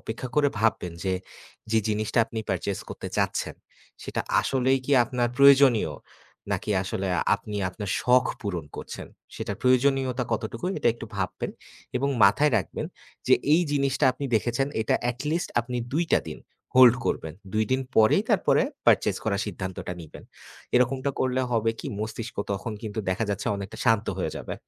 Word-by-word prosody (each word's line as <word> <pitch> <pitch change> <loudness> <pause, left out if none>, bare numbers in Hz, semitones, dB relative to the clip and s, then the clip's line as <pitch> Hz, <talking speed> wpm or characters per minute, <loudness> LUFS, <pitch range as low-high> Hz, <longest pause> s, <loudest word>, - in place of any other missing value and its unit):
অপেক্ষা 115 +3 -5
করে 145 -1 +5
ভাববেন 100 -6 +1
যে, 95 -1 +1 0.6
যে 110 - +5
জিনিসটা 110 +2 0
আপনি 115 - -6
purchase 100 -1 -2
করতে - - -6
চাচ্ছেন - - -1 0.5
সেটা - - -3 0.2
আসলেই 130 0 +1
কি 145 - 0
আপনার 120 -1 -1
প্রয়োজনীয় 135 - +6 0.6
নাকি 105 - -2
আসলে 95 0 -3 0.3
আপনি 105 -1 -7
আপনার 100 0 -5
শখ 125 +1 +4 0.2
পূরণ 90 -6 -3
করছেন। - - -7 0.3
সেটার - - -4
প্রয়োজনীয়তা 130 0 +2
কতটুকু 115 +6 -3
এটা - - +2
একটু 115 - -8
ভাববেন 95 -1 -3 0.5
এবং 140 +2 0 0.2
মাথায় 140 +8 +4
রাখবেন - - -4 0.4
যে - - +8 0.2
এই 175 - +5
জিনিসটা 140 0 +1
আপনি 140 +2 -6
দেখেছেন 120 +4 0 0.2
এটা - - +1 0.2
at 120 - -9
least 170 +2 -1
আপনি 125 +2 -5 0.2
২ 170 +3 +2
টা - - +3
দিন - - -7 0.4
hold 125 -1 +9
করবেন। 80 0 -2 0.2
২ 110 0 +2
দিন 130 - +2 0.2
পরেই 110 -1 +5
তারপরে - - +3 0.2
purchase - - +4
করার 100 -2 0
সিদ্ধান্তটা 95 -3 -5
নিবেন। 80 -3 -12 0.5
এরকমটা 130 +2 +2
করলে 130 0 +1
হবে 115 0 +2
কি, - - -7
মস্তিষ্ক 110 +2 -5 0.2
তখন 100 +3 -4
কিন্তু 110 -1 -5
দেখা 110 +5 0
যাচ্ছে 100 - -3
অনেকটা 100 +3 -7
শান্ত 115 -3 +3
হয়ে - - -1
যাবে। - - -5
115 Hz, 160 wpm, -26 LUFS, 105-130 Hz, 0.6 s, hold